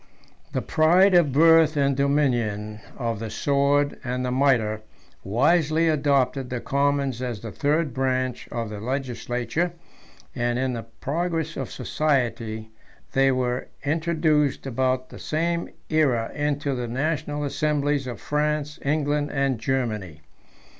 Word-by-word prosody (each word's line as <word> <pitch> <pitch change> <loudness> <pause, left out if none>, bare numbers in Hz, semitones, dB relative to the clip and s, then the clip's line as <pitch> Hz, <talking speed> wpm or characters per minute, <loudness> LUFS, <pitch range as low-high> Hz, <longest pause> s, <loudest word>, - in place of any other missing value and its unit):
III. - - -32
The - - 0
pride 175 +5 +4
of 170 -5 +5
birth 160 +1 +5
and 140 -1 +2
dominion, 120 -7 0 0.2
of 115 -4 -2
the 115 0 -4
sword 140 +4 +1
and 125 0 -2
the 125 - -1
mitre, 120 -5 +2 0.4
wisely 155 - +2
adopted 140 -3 +1
the 125 - -3
commons 140 -2 0
as 120 -5 -4
the 115 - -6
third 150 +2 0
branch 130 -1 -1
of 115 -2 -3
the 105 - -6
legislature, 125 +6 -2 0.6
and, 120 -1 -1
in 130 0 0
the 115 - -3 0.2
progress 165 +1 -2
of - - -4
society, 115 -7 -1 0.4
they 135 0 +3
were 125 -1 -1 0.2
introduced 155 -2 +1
about 130 0 0
the - - -11
same 170 +2 -1 0.2
aera 135 -8 +2
into 145 -1 -1
the 125 -1 -3
national 145 +3 -2
assemblies 145 -1 0
of 120 - -6
France 150 0 -1
England, 145 0 0
and 135 -4 0
Germany. 110 - -2
140 Hz, 135 wpm, -24 LUFS, 125-150 Hz, 0.6 s, of